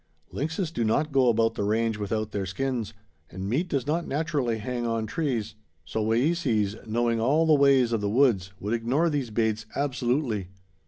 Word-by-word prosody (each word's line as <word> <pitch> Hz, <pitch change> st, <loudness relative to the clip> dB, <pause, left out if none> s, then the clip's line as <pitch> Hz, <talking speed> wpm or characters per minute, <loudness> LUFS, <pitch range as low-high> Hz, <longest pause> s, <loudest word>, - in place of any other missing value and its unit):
Lynxes 160 Hz, +4 st, -2 dB
do 120 Hz, -, -1 dB
not 150 Hz, +8 st, +1 dB
go 135 Hz, -2 st, +4 dB
about 115 Hz, 0 st, +2 dB
the 105 Hz, -, -3 dB
range 110 Hz, +1 st, +1 dB
without 110 Hz, +1 st, -2 dB
their 100 Hz, -2 st, -3 dB
skins, 115 Hz, +1 st, -3 dB, 0.3 s
and 95 Hz, +2 st, -6 dB
meat 145 Hz, -, 0 dB
does 140 Hz, -6 st, -1 dB
not 165 Hz, +4 st, -1 dB
naturally 145 Hz, -6 st, -1 dB
hang 120 Hz, +3 st, -3 dB
on 115 Hz, -1 st, -1 dB
trees; 125 Hz, -4 st, -2 dB, 0.3 s
so 110 Hz, +7 st, -2 dB
Wayeeses, 115 Hz, -, +1 dB
knowing 115 Hz, +1 st, +1 dB
all 150 Hz, +8 st, +3 dB
the 160 Hz, -, +5 dB
ways 140 Hz, -4 st, +4 dB
of 115 Hz, -2 st, 0 dB
the 100 Hz, -, 0 dB
woods, 110 Hz, -6 st, +2 dB
would 105 Hz, +3 st, -2 dB
ignore 130 Hz, +9 st, +1 dB
these 140 Hz, -5 st, -1 dB
baits 110 Hz, -1 st, -1 dB
absolutely. 125 Hz, -6 st, -1 dB
120 Hz, 175 wpm, -26 LUFS, 110-140 Hz, 0.3 s, the